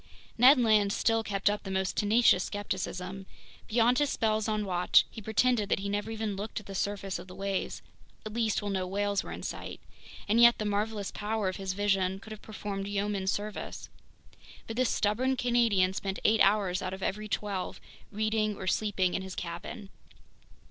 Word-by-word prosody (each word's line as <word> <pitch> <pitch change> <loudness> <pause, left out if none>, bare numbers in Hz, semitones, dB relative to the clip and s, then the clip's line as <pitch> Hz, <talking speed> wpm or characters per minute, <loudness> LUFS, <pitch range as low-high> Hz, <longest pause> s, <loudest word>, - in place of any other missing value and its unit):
Ned 255 +3 +7
Land 215 -4 +4
still 225 +2 +2
kept 200 -3 -2
up 205 0 +2
the 195 - -8
most 190 -1 -1
tenacious 210 -3 +4
skepticism; 190 -2 -4 0.4
beyond 240 +3 +3
his 290 -1 +2
spells 220 -3 0
on 215 -1 0
watch, 180 -2 +4
he 220 - -8
pretended 220 0 +1
that - - +2
he 200 - -3
never 205 +2 -2
even 220 -2 -3
looked 205 +3 -4
at 210 - -15
the 195 - -8
surface 195 0 -2
of - - -10
the 185 - -11
waves, 195 -1 -3 0.4
at 215 - -6
least 225 -2 0
while 205 - -2
no 185 -1 -1
whales 200 +1 0
were - - -8
in - - -7
sight. - - -6 0.5
And 225 +3 +4
yet 235 0 +8
the 215 - -3
marvelous 210 0 -1
power 210 -2 -1
of 185 - -5
his 190 -1 -3
vision 195 -2 +1
could 220 - -13
have 215 - -8
performed 200 -2 -5
yeoman 200 -1 -2
service. 205 +2 -3 0.8
But 225 - -6
this 255 0 +2
stubborn 255 +6 +1
Canadian 230 -7 +2
spent 195 0 -3
eight 220 0 +4
hours 195 -2 +3
out 185 0 -3
of 190 - -9
every 210 +2 -2
twelve 200 -3 -3 0.3
reading 215 0 0
or 190 - -7
sleeping 190 -2 +1
in - - -1
his 190 -1 -7
cabin. 180 +5 -6
205 Hz, 190 wpm, -29 LUFS, 195-220 Hz, 0.8 s, yet